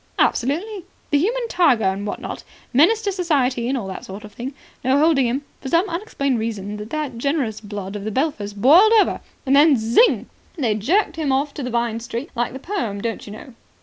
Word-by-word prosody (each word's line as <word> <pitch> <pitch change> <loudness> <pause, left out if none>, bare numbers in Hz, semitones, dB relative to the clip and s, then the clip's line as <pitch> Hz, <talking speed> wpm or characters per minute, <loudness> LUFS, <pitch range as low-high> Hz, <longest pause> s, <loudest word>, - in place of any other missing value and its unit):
"Absolutely. 350 - 0 0.3
The 290 - +4
human 470 +8 0
tiger, 295 - +3
and 195 +2 -1
what - - -4
not. - - -6 0.3
Menace 365 - +4
to 405 - 0
Society 270 -10 0
and 270 - 0
all 225 - -4
that 190 - -7
sort 195 +2 -9
of 210 -1 -11
thing. 260 +3 -6 0.3
No 260 +2 +3
holding 290 -4 +4
him. 260 +5 -2 0.2
For 265 - -5
some 340 +6 +3
unexplained 330 - -2
reason 210 -2 -4
the 265 +7 -4
generous 255 -5 -1
blood 205 -2 -6
of 205 - -5
the 215 - -3
Belphers 215 -6 -2
boiled 330 - +6
over, 410 - +1 0.2
and 270 0 +3
then 290 -1 +6
zing. 230 - +3 0.3
They 240 -8 +1
jerked 315 - +1
him 300 -4 0
off 280 +2 0
to 255 -4 -4
Vine 235 -1 -1
Street. 235 +5 -6
Like 240 0 -1
the - - -5
poem, 265 - -3
don't 225 +1 -4
you 205 - -8
know. 250 +4 -11
265 Hz, 205 wpm, -21 LUFS, 220-320 Hz, 0.3 s, boiled